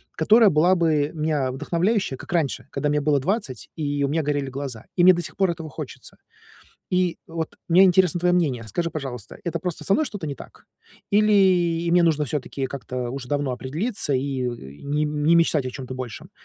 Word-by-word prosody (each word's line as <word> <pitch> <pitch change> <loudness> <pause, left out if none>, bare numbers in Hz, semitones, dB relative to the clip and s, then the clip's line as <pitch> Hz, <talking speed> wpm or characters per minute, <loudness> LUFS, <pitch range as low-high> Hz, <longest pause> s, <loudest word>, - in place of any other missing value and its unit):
которая 215 +6 +5
была 170 +4 +4
бы 155 -4 +1
меня 150 -4 -1
вдохновляющая, 175 - 0
как - - -11
раньше, 155 -5 -1
когда 150 - -1
мне 150 0 +1
было 145 -1 +2
20, 175 - -3
и 145 -2 -1
у - - +2
меня 155 +2 0
горели 145 -2 -1
глаза, 130 -4 -6
и 175 - +3
мне 185 0 +9
до 175 - -2
сих - - -9
пор 190 -3 +2
этого 165 -2 -7
хочется. - - -9 0.7
И 180 -1 +1
вот 165 -1 -5
мне 180 +3 +7
интересно 180 -2 +4
твоё 180 0 +3
мнение. 135 -9 0
Скажи, 170 - -2
пожалуйста, 130 -8 -6
это 170 -2 -2
просто 180 -1 -4
со 195 - +3
мной 310 - +2
что-то 205 -9 -6
не 140 - -4
так, - - -14 0.5
или 185 -5 +3
мне 175 0 +5
нужно 155 -3 +2
всё-таки 135 0 -3
как-то 125 -2 -5
уж 135 0 -6
давно 145 0 -1
определиться 150 - -2
и, 130 0 -1
э, 125 - 0 0.3
не 145 +2 0
не 150 +2 +2
мечтать 160 -5 +3
о - - -2
чём-то 130 0 -7
большем? 125 -4 -7
155 Hz, 195 wpm, -23 LUFS, 135-175 Hz, 0.7 s, мне